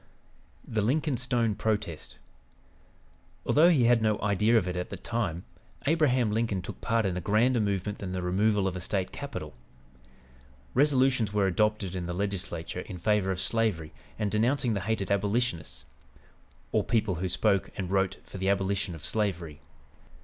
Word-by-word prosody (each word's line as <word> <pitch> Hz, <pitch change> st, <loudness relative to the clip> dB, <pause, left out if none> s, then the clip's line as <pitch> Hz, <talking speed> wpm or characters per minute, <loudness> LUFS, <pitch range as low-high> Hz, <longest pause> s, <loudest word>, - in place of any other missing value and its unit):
THE 110 Hz, -2 st, 0 dB
LINCOLN 140 Hz, +5 st, +1 dB
STONE 120 Hz, -3 st, +1 dB
PROTEST 105 Hz, -7 st, -3 dB, 1.3 s
Although 160 Hz, +4 st, +5 dB
he 150 Hz, -8 st, +4 dB
had 120 Hz, -1 st, +4 dB
no 110 Hz, -1 st, +1 dB
idea 105 Hz, +3 st, +3 dB
of 95 Hz, -5 st, +1 dB
it 90 Hz, -, -2 dB
at 90 Hz, 0 st, -3 dB
the -, -, -6 dB
time, 95 Hz, -8 st, -3 dB, 0.4 s
Abraham 130 Hz, -7 st, +3 dB
Lincoln 110 Hz, -4 st, 0 dB
took -, -, -8 dB
part 115 Hz, -2 st, +1 dB
in 95 Hz, -2 st, 0 dB
a 90 Hz, -, -3 dB
grander 115 Hz, +6 st, +3 dB
movement 100 Hz, -1 st, -1 dB
than 95 Hz, -2 st, -5 dB
the 90 Hz, -1 st, -3 dB
removal 100 Hz, +2 st, +2 dB
of 95 Hz, -, -2 dB
a 90 Hz, -, -5 dB
State 95 Hz, +1 st, -2 dB
capital. -, -, -6 dB, 1.2 s
Resolutions 130 Hz, -6 st, +3 dB
were 105 Hz, -2 st, +2 dB
adopted 105 Hz, 0 st, +1 dB
in 90 Hz, -2 st, -4 dB
the 90 Hz, -, -3 dB
Legislature 95 Hz, -4 st, -3 dB
in 90 Hz, -, -8 dB
favor 105 Hz, +1 st, +1 dB
of 95 Hz, -2 st, -1 dB
slavery 95 Hz, -8 st, 0 dB, 0.2 s
and 105 Hz, -2 st, -1 dB
denouncing 120 Hz, +3 st, +2 dB
the 100 Hz, -, -1 dB
hated 105 Hz, 0 st, -2 dB
"abolitionists" 100 Hz, -, -1 dB, 0.9 s
or -, -, +2 dB
people 110 Hz, -5 st, +1 dB
who 95 Hz, -, -1 dB
spoke 95 Hz, +1 st, +1 dB
and 95 Hz, -2 st, -3 dB
wrote 95 Hz, -1 st, +1 dB
for 95 Hz, -, -9 dB
the 95 Hz, +1 st, +1 dB
abolition 100 Hz, -2 st, 0 dB
of 80 Hz, 0 st, -8 dB
slavery. 85 Hz, -6 st, -2 dB
105 Hz, 165 wpm, -28 LUFS, 95-115 Hz, 1.3 s, Although